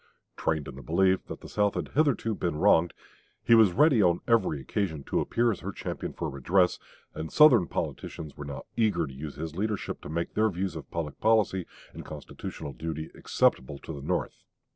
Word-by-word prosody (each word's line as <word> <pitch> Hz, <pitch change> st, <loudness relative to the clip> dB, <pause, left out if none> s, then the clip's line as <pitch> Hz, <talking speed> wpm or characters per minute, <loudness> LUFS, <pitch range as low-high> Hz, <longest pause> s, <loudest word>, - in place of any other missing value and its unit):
Trained 80 Hz, -3 st, -1 dB
in -, -, -7 dB
the 70 Hz, -, -10 dB
belief 95 Hz, +7 st, +2 dB
that -, -, -7 dB
the -, -, -9 dB
South 105 Hz, -1 st, +1 dB
had -, -, -3 dB
hitherto 140 Hz, -7 st, +1 dB
been 85 Hz, -6 st, -2 dB
wronged, 80 Hz, +2 st, +4 dB, 0.5 s
he -, -, +4 dB
was 110 Hz, -4 st, +7 dB
ready 140 Hz, -, +4 dB
on 85 Hz, -2 st, +3 dB
every 115 Hz, -11 st, +2 dB
occasion 80 Hz, -, -2 dB
to -, -, -1 dB
appear 120 Hz, 0 st, +1 dB
as 100 Hz, -, -4 dB
her -, -, -5 dB
champion -, -, -5 dB
for 85 Hz, -, -4 dB
redress; 85 Hz, +7 st, +1 dB, 0.3 s
and 80 Hz, 0 st, -6 dB
Southern 125 Hz, -, +6 dB
politicians 75 Hz, -3 st, -5 dB
were 75 Hz, -, -7 dB
now 70 Hz, -1 st, -6 dB
eager 105 Hz, -8 st, +2 dB
to 70 Hz, -, -9 dB
use 70 Hz, +2 st, -7 dB
his 80 Hz, 0 st, -6 dB
leadership 105 Hz, +2 st, -3 dB
to -, -, -9 dB
make 85 Hz, +2 st, -3 dB
their 110 Hz, +1 st, +3 dB
views 95 Hz, 0 st, -3 dB
of -, -, -8 dB
public 80 Hz, -3 st, -4 dB
policy 105 Hz, -5 st, +2 dB, 0.3 s
and -, -, -8 dB
constitutional 75 Hz, -3 st, -7 dB
duty 80 Hz, 0 st, -5 dB
acceptable 70 Hz, +2 st, +1 dB
to 80 Hz, -, -8 dB
the 70 Hz, -, -7 dB
North. -, -, -1 dB
85 Hz, 195 wpm, -28 LUFS, 75-110 Hz, 0.5 s, was